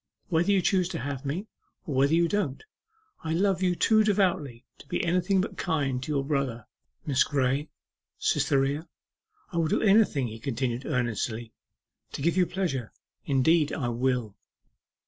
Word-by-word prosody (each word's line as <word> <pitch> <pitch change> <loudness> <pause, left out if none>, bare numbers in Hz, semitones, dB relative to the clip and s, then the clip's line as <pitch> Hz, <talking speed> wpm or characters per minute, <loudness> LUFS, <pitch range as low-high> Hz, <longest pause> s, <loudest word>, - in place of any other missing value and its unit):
Whether 175 +3 +2
you 195 -2 +3
choose 185 -3 +2
to - - -4
have 140 +1 -4
me, 170 +9 -3 0.4
or 155 - -4
whether 140 +4 +3
you 170 0 +3
don't, 165 -8 -2 0.6
I 160 0 -2
love 190 0 +1
you 180 -1 +2
too 215 +4 +4
devotedly 185 - 0
to - - -15
be 150 - -1
anything 180 +2 +2
but 195 - -5
kind 140 -7 -1
to 140 - -5
your 140 -2 0
brother.... 135 -6 -2 0.4
Miss 140 -5 +3
Graye, 140 +1 0 0.5
Cytherea, 140 +4 +1 0.6
I 170 - -4
will 165 -1 +2
do - - +1
anything,' 195 - +4
he 110 +1 -9
continued 125 0 -2
earnestly, 120 -3 -2 0.6
'to - - -5
give 170 +2 +2
you 180 -2 +3
pleasure 150 - -2 0.4
indeed 150 +3 +3
I 125 -6 -2
will. 120 -3 -1
145 Hz, 160 wpm, -27 LUFS, 130-180 Hz, 0.6 s, too